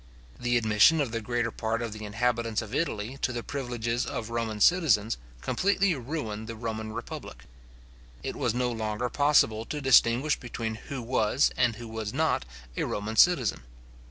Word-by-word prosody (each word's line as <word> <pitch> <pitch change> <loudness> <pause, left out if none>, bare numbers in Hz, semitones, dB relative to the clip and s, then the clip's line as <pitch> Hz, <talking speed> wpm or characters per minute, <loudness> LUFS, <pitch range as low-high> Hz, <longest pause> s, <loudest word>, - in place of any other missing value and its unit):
The 120 0 +1
admission 110 +8 +5
of 135 -6 0
the 115 0 -2
greater 120 0 -1
part 115 +1 -2
of 115 -2 -4
the 110 0 -7
inhabitants 115 +1 0
of 110 +1 -10
Italy 130 -4 -2
to - - +1
the 120 -1 -4
privileges 120 -3 -2
of 115 0 -5
Roman 115 -2 -2
citizens, 120 - +3 0.2
completely 200 - +2
ruined 120 -6 -4
the 115 - -6
Roman 110 -1 -4
republic. 110 - -7 0.8
It - - -4
was 120 -2 -1
no 125 0 0
longer 110 +1 -2
possible 140 -7 +3
to 150 - -4
distinguish 135 +1 +4
between 115 -3 -4 0.2
who 135 -3 -4
was, 115 +1 +2
and 125 -2 +2
who 120 +1 -8
was 110 0 -5
not, 155 - +1 0.3
a - - -1
Roman 105 +2 -3
citizen. 135 - +4
115 Hz, 165 wpm, -28 LUFS, 110-130 Hz, 0.8 s, admission